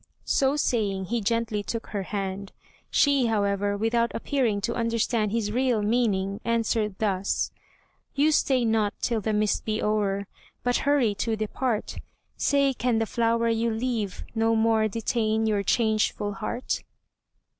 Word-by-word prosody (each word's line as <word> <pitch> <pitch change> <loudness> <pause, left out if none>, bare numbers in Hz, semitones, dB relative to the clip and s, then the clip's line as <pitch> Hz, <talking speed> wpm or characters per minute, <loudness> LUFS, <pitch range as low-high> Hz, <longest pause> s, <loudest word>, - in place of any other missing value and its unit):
So 270 +1 +2
saying, 205 -9 0
he 230 +4 -1
gently 225 0 0
took 230 +2 -4
her 205 - -2
hand; 195 0 -4 0.4
she, 280 -4 +3
however, 205 -2 0
without 230 +2 +1
appearing 235 -5 0
to 235 - -1
understand 230 -2 0
his 220 -2 -1
real 245 -2 +1
meaning, 205 -3 0
answered 225 -3 0
thus: 195 -2 0 0.6
"You 295 +3 +3
stay 265 -5 +2
not 220 -2 +1
till 230 -3 0
the 220 - -1
mist 210 0 +1
be 215 0 -1
o'er, 200 -2 0 0.4
But 245 0 +2
hurry 260 -7 +3
to 225 -1 0
depart, 220 +1 -2 0.4
Say 280 -1 +2
can 245 -2 0
the 225 - +1
flower 230 +1 +1
you 230 +1 +1
leave, 225 -3 -2
no 225 0 +2
more 220 -1 +3
Detain 220 0 0
your 210 -2 +1
changeful 215 -1 +1
heart?" 240 +5 -3
225 Hz, 145 wpm, -26 LUFS, 205-235 Hz, 0.6 s, she